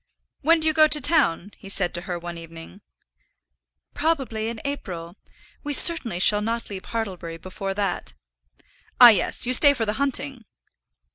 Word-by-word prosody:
"When 330 Hz, +3 st, +2 dB
do 315 Hz, -, -5 dB
you 315 Hz, -, +1 dB
go 310 Hz, 0 st, +5 dB
to 300 Hz, 0 st, +3 dB
town?" 250 Hz, -, 0 dB
he 195 Hz, -, -13 dB
said 195 Hz, -2 st, 0 dB
to 175 Hz, -, -1 dB
her 175 Hz, -, -3 dB
one 175 Hz, 0 st, -8 dB
evening. 165 Hz, +3 st, -13 dB, 1.1 s
"Probably 265 Hz, -9 st, -2 dB
in 230 Hz, -1 st, -8 dB
April. 180 Hz, -11 st, -7 dB, 0.5 s
We 290 Hz, -1 st, -4 dB
certainly 270 Hz, -, +5 dB
shall 210 Hz, +2 st, +3 dB
not 230 Hz, +1 st, -5 dB
leave 190 Hz, -1 st, -8 dB
Hartlebury 185 Hz, -7 st, -6 dB
before 195 Hz, +3 st, -7 dB
that." 195 Hz, -, -4 dB, 0.8 s
"Ah, 245 Hz, -, +10 dB
yes. 215 Hz, +2 st, 0 dB
You 250 Hz, -, -1 dB
stay 285 Hz, +2 st, +5 dB
for 225 Hz, -, -2 dB
the 210 Hz, -, -3 dB
hunting." 275 Hz, -3 st, -3 dB
220 Hz, 160 wpm, -22 LUFS, 180-280 Hz, 1.1 s, Ah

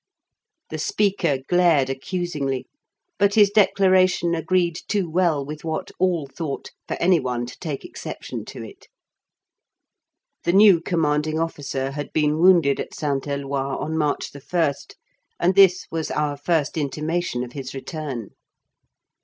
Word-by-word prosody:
The -, -, -4 dB
speaker 195 Hz, -, +1 dB
glared 170 Hz, -6 st, +4 dB
accusingly; 140 Hz, -1 st, -3 dB, 0.5 s
but 200 Hz, 0 st, +3 dB
his 205 Hz, -2 st, +6 dB
declaration 185 Hz, -4 st, +3 dB
agreed 170 Hz, 0 st, 0 dB
too 200 Hz, -4 st, 0 dB
well 165 Hz, -4 st, +1 dB
with 150 Hz, +1 st, -8 dB
what 160 Hz, -1 st, -3 dB
all 175 Hz, -5 st, +1 dB
thought 140 Hz, +1 st, -6 dB, 0.2 s
for -, -, -2 dB
any 180 Hz, 0 st, +4 dB
one 125 Hz, -3 st, -2 dB
to 125 Hz, -, -9 dB
take 150 Hz, -6 st, -5 dB
exception -, -, -7 dB
to -, -, -8 dB
it. -, -, -13 dB, 1.6 s
The 170 Hz, -, +1 dB
new 195 Hz, -4 st, +7 dB
Commanding 155 Hz, -2 st, 0 dB
Officer 140 Hz, -4 st, -3 dB
had 145 Hz, +1 st, -6 dB
been 150 Hz, 0 st, +1 dB
wounded 170 Hz, -6 st, +5 dB
at -, -, -5 dB
St. 140 Hz, -2 st, -2 dB
Eloi 140 Hz, -1 st, -2 dB
on 160 Hz, +1 st, -3 dB
March 150 Hz, -2 st, -1 dB
1st 145 Hz, +1 st, -2 dB, 0.4 s
and 180 Hz, +2 st, +3 dB
this 190 Hz, -2 st, +5 dB
was 160 Hz, -1 st, -2 dB
our 150 Hz, -1 st, -1 dB
first 150 Hz, +1 st, 0 dB
intimation 155 Hz, -1 st, -2 dB
of 120 Hz, -, -8 dB
his 135 Hz, -2 st, -6 dB
return. 135 Hz, -, -5 dB
155 Hz, 135 wpm, -23 LUFS, 140-175 Hz, 1.6 s, new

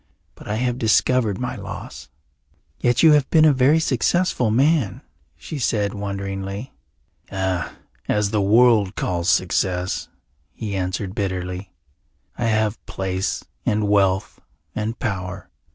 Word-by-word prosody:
But -, -, -14 dB
I 105 Hz, -, -1 dB
have 125 Hz, +2 st, -1 dB
discovered 110 Hz, -1 st, +2 dB
my 125 Hz, -, -3 dB
loss." -, -, -8 dB, 0.7 s
"Yet 120 Hz, +3 st, +2 dB
you 160 Hz, -, +8 dB
have 145 Hz, -3 st, +3 dB
been 155 Hz, -1 st, +5 dB
a 150 Hz, -, +6 dB
very 135 Hz, +4 st, +4 dB
successful 150 Hz, -2 st, +1 dB
man," 135 Hz, -, +2 dB, 0.4 s
she 150 Hz, -, -7 dB
said 105 Hz, -5 st, 0 dB
wonderingly. 100 Hz, +2 st, -5 dB, 0.6 s
"As 95 Hz, 0 st, -2 dB
the 105 Hz, -2 st, +1 dB
world 110 Hz, -1 st, +4 dB
calls 85 Hz, 0 st, -1 dB
success," 90 Hz, +1 st, 0 dB, 0.4 s
he 105 Hz, -3 st, -5 dB
answered 95 Hz, +1 st, -2 dB
bitterly. 95 Hz, -1 st, -3 dB, 0.6 s
"I 120 Hz, -, -2 dB
have 110 Hz, -1 st, 0 dB
place 95 Hz, -1 st, -2 dB, 0.2 s
and 105 Hz, 0 st, +1 dB
wealth 95 Hz, -2 st, +2 dB, 0.3 s
and 110 Hz, +2 st, -3 dB
power. 95 Hz, -3 st, -4 dB
105 Hz, 120 wpm, -22 LUFS, 95-120 Hz, 0.7 s, you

